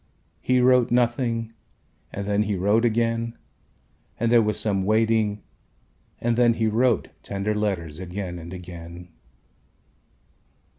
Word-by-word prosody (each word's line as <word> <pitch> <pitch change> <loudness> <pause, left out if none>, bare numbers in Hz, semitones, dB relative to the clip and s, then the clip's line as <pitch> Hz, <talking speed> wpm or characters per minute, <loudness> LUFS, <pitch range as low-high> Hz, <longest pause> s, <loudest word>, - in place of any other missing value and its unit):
He 125 0 +2
wrote 125 -1 +4
nothing 120 -1 0 0.6
and 100 - -5
then 105 0 +1
he 105 -1 0
wrote 105 +5 +2
again 115 0 0 0.8
and 115 0 +1
there 120 -1 +6
was 105 -1 0
some 100 -3 0
waiting 110 0 +1 0.8
and 120 0 0
then 120 -1 +4
he 115 - 0
wrote 120 +4 +2
tender 100 +2 -2
letters 95 -7 -2
again 90 -1 -5
and 85 +1 -9
again. 90 -1 -9
105 Hz, 120 wpm, -24 LUFS, 95-115 Hz, 0.8 s, there